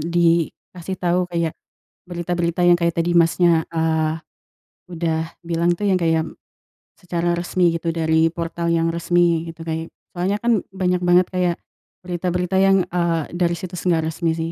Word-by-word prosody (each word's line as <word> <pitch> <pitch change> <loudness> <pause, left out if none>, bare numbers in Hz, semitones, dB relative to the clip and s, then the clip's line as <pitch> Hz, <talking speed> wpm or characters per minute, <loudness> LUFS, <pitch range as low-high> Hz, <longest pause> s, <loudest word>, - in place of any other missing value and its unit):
dikasih 170 +2 -1
tau 180 0 0
kayak 170 -2 -1 0.5
berita-berita 175 -1 -2
yang 175 - +6
kayak 170 0 0
tadi, 175 +1 +1
Masnya, 170 -1 +4
eee, 160 -1 0 0.7
udah 165 -1 -2
bilang 170 0 0
tuh 205 +4 -1
yang 190 - +3
kayak 165 -2 +1 0.7
secara 175 -1 -1
resmi 175 0 +1
gitu 165 0 -3
dari 160 0 +2
portal 170 0 -3
yang 165 0 +1
resmi 170 0 +1
gitu 165 0 -9
kay 160 0 -4 0.2
soalnya 185 +3 -1
kan 235 -4 +3
banyak 180 -1 0
banget 175 +1 +4
kayak 180 -2 0 0.5
berita-berita 180 +1 -1
yang, 195 0 +5
eee, 170 -2 0 0.2
dari 175 -1 +1
situs 180 0 -7
nggak 160 -2 +1
resmi 165 +1 -1
sih. 165 0 -3
170 Hz, 150 wpm, -21 LUFS, 165-180 Hz, 0.7 s, yang